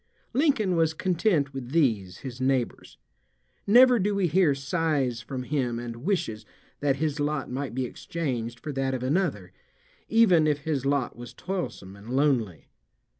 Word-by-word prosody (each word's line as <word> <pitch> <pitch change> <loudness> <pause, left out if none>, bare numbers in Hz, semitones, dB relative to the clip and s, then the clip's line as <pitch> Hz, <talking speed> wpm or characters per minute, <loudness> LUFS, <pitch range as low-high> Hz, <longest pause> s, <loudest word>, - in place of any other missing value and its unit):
Lincoln 250 - +2
was 160 -1 +2
content 170 -6 +1
with 130 -2 -6
these, 110 - +1
his 130 -1 -6
neighbors. 130 -2 -1 0.7
Never 245 +3 +7
do 205 +1 0
we 200 -2 +1
hear 170 -3 +3
sighs 140 -4 -1
from 130 +1 -5
him 125 -4 -1
and 120 -1 -6
wishes 120 - -2 0.4
that 140 -2 +1
his 150 +1 -2
lot 145 -2 -1
might 130 -1 -4
be 130 -1 -1
exchanged 120 -5 -4
for 150 - -5
that 135 -1 -1
of 125 - -4
another, 130 - -1 0.6
even 190 -9 +5
if 145 -1 0
his 140 -3 -2
lot 140 -3 0
was 120 0 -10
toilsome 175 - -5
and 100 +3 -13
lonely. 125 - 0
140 Hz, 155 wpm, -26 LUFS, 125-170 Hz, 0.7 s, Never